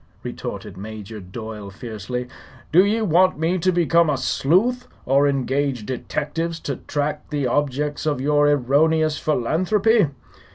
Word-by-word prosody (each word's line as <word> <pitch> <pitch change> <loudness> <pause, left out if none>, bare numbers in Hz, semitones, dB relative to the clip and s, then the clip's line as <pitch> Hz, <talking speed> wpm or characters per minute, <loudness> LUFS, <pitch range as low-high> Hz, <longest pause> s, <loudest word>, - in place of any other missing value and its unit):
retorted 100 -3 -6
Major 110 +1 -8
Doyle, 105 +2 -8
fiercely. 115 +4 -5 0.4
"Do 180 +4 +7
ye 220 +3 +1
want 185 -1 +3
me 165 +4 0
to 185 +2 +2
become 170 -1 +3
a 145 - +1
sleuth, 190 - +1 0.2
or 140 +2 +4
engage 135 -3 -1
detectives 165 +6 -3
to 140 - -3
track 150 0 -3
the 145 -3 -1
objects 145 +3 -1
of 145 -4 0
your 145 +2 +3
erroneous 150 +3 +2
philanthropy? 185 - +2
145 Hz, 130 wpm, -22 LUFS, 125-165 Hz, 0.4 s, Do